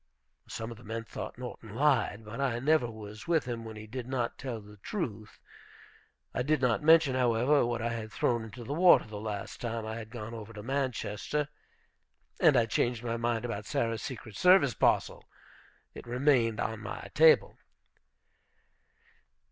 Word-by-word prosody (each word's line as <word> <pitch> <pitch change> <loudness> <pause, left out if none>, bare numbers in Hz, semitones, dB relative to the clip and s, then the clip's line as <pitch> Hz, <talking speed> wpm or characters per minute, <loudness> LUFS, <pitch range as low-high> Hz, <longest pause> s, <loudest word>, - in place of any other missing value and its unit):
Some 115 +1 -5
of 115 - -9
the 120 - -15
men 115 +1 -4
thought 115 - -7
Norton 120 -3 -8
lied. 125 -6 +2
But 115 +5 -6
I 130 -4 +1
never 135 -1 +2
was 105 +1 -10
with 165 -4 +2
him 120 -2 -4
when 110 -1 -8
he 110 0 -8
did 125 +2 -6
not 130 -3 -2
tell 125 -4 -4
the 105 0 -14
truth. 110 - -5 0.9
I - - -1
did 150 +3 +1
not 125 -4 +2
mention, 160 -3 +6
however, 125 +3 +3
what 120 -1 -2
I 120 - 0
had 110 -1 -5
thrown 120 -1 0
into 110 +2 -9
the 135 - -4
water 175 +3 +6
the 105 -1 -7
last 105 -2 -5
time 115 -2 -3
I 110 +1 -4
had 110 -1 -8
gone 115 -1 -7
over 115 0 -8
to 105 -1 -8
Manchester. 135 +2 -2 0.9
And 155 -7 +6
I 120 - +4
changed 120 +1 0
my 115 -1 -2
mind 115 0 -1
about 105 -3 -4
Sarah's 115 -2 -1
"secret 115 -5 -7
service" 180 -8 +5
parcel. - - +1 0.7
It - - -10
remained 120 -3 +2
on 110 -1 -2
my 105 - -7
table. 160 +1 +5
115 Hz, 170 wpm, -30 LUFS, 110-130 Hz, 0.9 s, mention